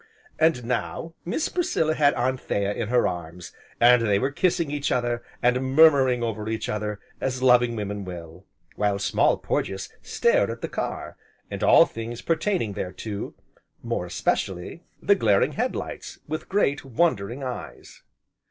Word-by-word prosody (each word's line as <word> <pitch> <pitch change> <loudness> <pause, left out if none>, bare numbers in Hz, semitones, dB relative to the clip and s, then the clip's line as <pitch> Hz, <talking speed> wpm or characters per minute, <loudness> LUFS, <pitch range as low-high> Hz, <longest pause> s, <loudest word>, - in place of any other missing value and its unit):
And 160 -7 +3
now 125 +7 -3
Miss 200 - -1
Priscilla 165 - 0
had 145 -2 +3
Anthea 120 -5 -1
in 115 - -3
her 120 +2 +3
arms, 85 0 -6 0.3
and 120 0 +6
they 105 -3 +2
were 135 +6 0
kissing 170 -1 0
each 145 -1 -1
other, 120 -1 0 0.2
and 130 +2 +1
murmuring 135 -6 +6
over 110 -2 -3
each 110 0 -3
other, 105 -1 -3 0.2
as 130 -1 -2
loving 120 -2 +5
women 105 -1 -4
will, 85 -1 -9 0.3
while 105 -1 +1
Small 100 - +2
Porges 95 0 -3
stared - - +2
at - - -6
the - - -2
car, - - -5 0.3
and - - -5
all - - +7
things 115 -2 -7
pertaining 165 - 0
thereto, 100 +3 -5 0.5
more - - -2
especially, 95 - -2 0.2
the 200 - +5
glaring 105 - +3
head - - -1
lights, - - -6
with 155 +1 -5
great 165 -8 +1
wondering 130 -3 0
eyes. 125 -1 -7
120 Hz, 150 wpm, -25 LUFS, 105-145 Hz, 0.5 s, all